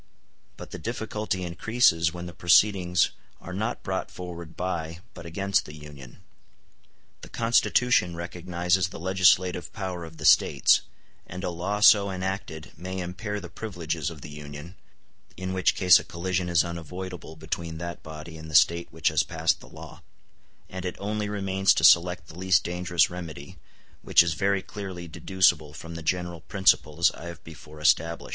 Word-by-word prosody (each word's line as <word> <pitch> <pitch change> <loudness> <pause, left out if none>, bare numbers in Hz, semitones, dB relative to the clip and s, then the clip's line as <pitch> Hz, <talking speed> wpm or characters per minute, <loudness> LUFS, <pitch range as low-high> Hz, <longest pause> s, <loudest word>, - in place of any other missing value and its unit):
But - - -10
the - - -7
difficulty 110 -4 -3
increases 85 -2 +2
when 90 +1 -7
the 85 - -8
proceedings 90 -1 +3 0.3
are 90 - -9
not 110 +5 -3
brought 95 0 -3
forward 85 -3 -9
by 85 -3 -3 0.2
but 85 -3 -10
against 100 +4 0
the 75 - -10
Union. 75 -4 -13 1.0
The - - -11
Constitution 115 -4 +2
recognizes 90 +1 -1
the - - -9
legislative 90 -1 +2
power 95 -4 -5
of 80 -1 -11
the 80 - -6
States; 75 - +5 0.5
and 90 +1 -7
a 90 - -2
law 95 +5 -3
so 100 -2 +7
enacted 95 -4 -5
may 95 +4 -6
impair 105 +4 -4
the 90 - -8
privileges 85 -8 -4
of 80 -4 -11
the 75 - -9
Union, 75 +3 -9 0.6
in 95 +1 -4
which 95 -2 +2
case 90 -2 +6
a - - -7
collision 90 0 -3
in 85 - -5
unavoidable 85 0 -7
between 80 +1 -5
that 85 +1 -6
body 80 +1 -9
and 80 0 -10
the 80 - -5
State 85 +2 +4
which 80 0 +1
has 75 -1 +2
passed 80 -1 0
the - - -15
law: - - -12 0.7
and 95 -1 -7
it 90 - -4
only 105 +1 -3
remains 95 -1 +2
to - - 0
select 90 -1 +5
the 80 +3 -12
least 95 0 +3
dangerous 90 -1 +1
remedy, 80 -5 -8 0.4
which - - +5
is 85 -2 -1
very 95 +4 0
clearly 95 -4 -7
deducible 85 -2 +1
from 85 +2 -9
the 85 - -7
general 85 0 -2
principles 85 -3 +2
I - - -11
have 85 -1 -9
before 75 -1 -13
established. 80 +2 +1
90 Hz, 165 wpm, -26 LUFS, 80-95 Hz, 1.0 s, so